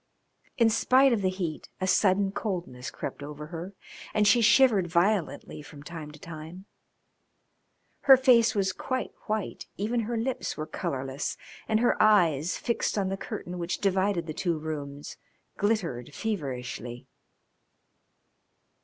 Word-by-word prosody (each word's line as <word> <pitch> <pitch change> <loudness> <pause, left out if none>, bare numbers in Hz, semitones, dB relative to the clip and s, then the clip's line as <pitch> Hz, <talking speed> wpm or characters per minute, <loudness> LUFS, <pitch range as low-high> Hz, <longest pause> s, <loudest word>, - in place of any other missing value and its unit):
In 230 -3 +5
spite 260 +4 +4
of 220 - 0
the 190 - +2
heat 180 -5 -4
a 185 - -1
sudden 195 +1 +3
coldness 170 - -4
crept - - -6
over 150 +1 -7
her, 175 +4 -6 0.4
and 210 -1 +4
she 235 +4 +5
shivered 215 -4 +5
violently 175 -2 0
from 145 -1 -12
time 160 -1 -7
to 150 - -12
time. 165 +4 -9 1.4
Her 265 - +11
face 245 -4 +5
was 195 -2 +1
quite 255 +7 -3 0.2
white, 215 -2 -3
even 225 +5 0
her 230 +1 -2
lips 245 +3 -2
were 155 - -3
colourless 140 -4 -3 0.3
and 220 0 +2
her 240 - +2
eyes, 175 -7 +4
fixed 235 -2 -1
on 195 -2 +1
the 195 - -1
curtain 180 -2 -6
which 170 +1 -2
divided 190 -2 +1
the 155 - -5
two 175 -1 -1
rooms, 145 -2 -6 0.4
glittered 165 - -1
feverishly. 125 - -4
185 Hz, 135 wpm, -28 LUFS, 155-215 Hz, 1.4 s, Her